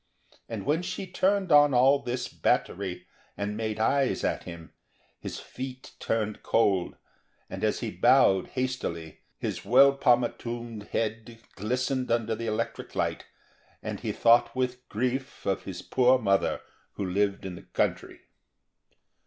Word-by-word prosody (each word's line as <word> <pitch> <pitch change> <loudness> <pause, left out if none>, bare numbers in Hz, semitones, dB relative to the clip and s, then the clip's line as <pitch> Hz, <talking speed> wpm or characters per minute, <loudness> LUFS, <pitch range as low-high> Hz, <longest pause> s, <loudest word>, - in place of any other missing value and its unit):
And 110 -4 -5
when 155 +4 +1
she 185 +1 -4
turned 190 0 +1
on 145 -2 +6
all 135 +3 +5
this 125 -1 -3
battery 95 -1 -1 0.3
and 105 +1 -3
made 110 -1 -3
eyes 135 +4 +1
at - - -1
him, 85 -1 -10 0.5
his - - -6
feet 130 0 -8
turned 110 -2 -2
cold, 100 -6 +1 0.6
and, - - -6
as - - +1
he - - -3
bowed 95 -1 +4
hastily, 125 -11 -4 0.2
his - - -4
well 135 +6 +6
pomatumed 120 -3 0
head 115 +1 -3
glistened 125 +5 -1
under 115 -1 +1
the 115 +1 -4
electric 110 -1 -3
light, - - -1 0.6
and - - -4
he - - -3
thought 115 +2 +4
with 125 0 -2
grief 130 +4 -3
of 95 - -1
his 95 - -6
poor 130 0 +4
mother 100 -5 +1 0.3
who 100 - -3
lived 100 +2 0
in 95 - -5
the - - -9
country. - - -2
120 Hz, 140 wpm, -28 LUFS, 105-130 Hz, 0.6 s, on